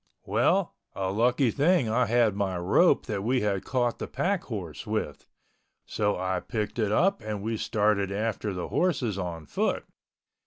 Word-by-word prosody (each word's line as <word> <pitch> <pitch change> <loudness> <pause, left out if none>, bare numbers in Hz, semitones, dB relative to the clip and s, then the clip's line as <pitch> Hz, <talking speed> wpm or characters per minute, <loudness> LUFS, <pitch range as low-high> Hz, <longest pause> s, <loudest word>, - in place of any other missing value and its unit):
Well, - - +2 0.2
a 95 -1 -1
lucky 120 +4 +2
thing 150 -1 +3
I 120 +3 +2
had 115 -3 +3
my 95 -3 -1
rope 85 0 +3
that 100 -2 -3
we 125 +3 +1
had 100 -2 0
caught 120 -3 0
the - - -4
pack 195 0 -1
horse 95 - -6
with. - - -3 0.6
So 105 -1 0
I 95 0 -1
picked 110 +1 -4
it 105 -2 +1
up 195 - +2
and 105 -2 -4
we 115 +1 -1
started 105 -2 +1
after 105 0 -2
the 90 -2 -4
horses 130 - 0
on 85 -4 -5
foot. - - -1
110 Hz, 165 wpm, -27 LUFS, 100-120 Hz, 0.6 s, thing